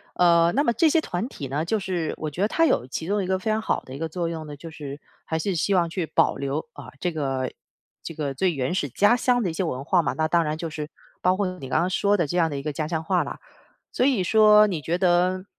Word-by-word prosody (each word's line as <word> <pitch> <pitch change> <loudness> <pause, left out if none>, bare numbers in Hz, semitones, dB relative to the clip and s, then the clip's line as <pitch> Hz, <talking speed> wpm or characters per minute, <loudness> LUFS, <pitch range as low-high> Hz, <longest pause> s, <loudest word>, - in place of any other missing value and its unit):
呃， 170 -1 +4
那 285 - +2
么 235 - +2
这 315 +8 +3
些 325 - +3
团 225 - -3
体 145 - -7
呢， 140 +4 -2
就 215 +6 0
是 180 -5 -2
我 155 - -3
觉 160 +5 -6
得 205 - +2
它 330 - +3
有 260 - +2
其 150 +5 -5
中 205 +1 0
一 - - -4
个 190 0 0
非 205 - -3
常 215 0 +1
好 - - 0
的 130 - -9
一 - - -6
个 165 +2 -3
作 170 +1 -2
用 165 -1 -5
呢， 145 -1 -9
就 165 +3 -9
是 145 -2 -8 0.2
还 160 - -2
是 190 +3 -1
希 185 +5 +1
望 175 -3 +2
去 170 +1 -2
保 - - +2
留， 140 +7 -3
啊， 130 -3 -11
这 175 +2 -2
个 135 -4 -2 0.5
这 - - -6
个 145 -3 -3
最 175 +6 +1
原 135 +3 -2
始 145 -6 -1
家 205 - +4
乡 245 0 +2
的 195 - 0
一 - - -4
些 175 - -1
文 135 -5 -3
化 175 +2 +3
嘛。 155 - -1
那 155 0 0
当 170 +1 +2
然 155 0 -2
就 165 0 -4
是 150 -1 -6 0.3
包 185 +1 +2
括 200 -1 0
你 135 - -8
刚 - - +2
刚 175 - +1
说 200 +2 +2
的 170 -5 0
这 160 - -4
样 165 -2 +3
的 145 - -4
一 - - -4
个 150 +1 -4
家 155 +1 -3
乡 160 -2 -1
话 180 0 +2
了， - - -7 0.5
所 255 - +1
以 255 -9 +2
说， 210 +2 +6
你 175 -6 -2
觉 160 +4 -1
得 180 0 +2
170 Hz, 310 characters per minute, -24 LUFS, 150-190 Hz, 0.5 s, 说